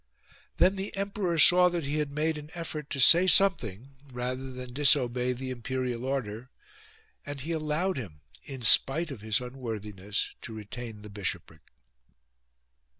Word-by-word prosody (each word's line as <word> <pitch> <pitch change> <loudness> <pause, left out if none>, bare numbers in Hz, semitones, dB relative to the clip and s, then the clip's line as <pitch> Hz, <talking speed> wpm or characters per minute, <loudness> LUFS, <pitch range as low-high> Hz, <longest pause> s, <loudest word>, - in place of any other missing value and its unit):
Then 190 +2 +3
the 195 +1 -5
emperor 195 -3 -2
saw 180 +4 +7
that 175 -2 -3
he 145 +2 -2
had 150 -1 -1
made 155 +3 -1
an 150 0 -12
effort 155 -3 -6
to 140 - -3
say 170 +7 +7
something 135 - +2
rather 125 +2 -4
than 125 -1 -9
disobey 125 -3 +2
the 130 +1 -5
imperial 125 0 -4
order; 125 -3 -4 0.7
and 145 -1 -7
he 160 +5 -5
allowed 160 +3 -1
him, 85 - -8 0.2
in 135 -3 -9
spite 145 +8 +5
of 125 -7 -8
his 110 -1 0
unworthiness, 105 -6 -5
to 110 - -8
retain 110 0 -8
the 105 - -10
bishopric. 95 -6 -5
130 Hz, 150 wpm, -28 LUFS, 115-155 Hz, 0.7 s, saw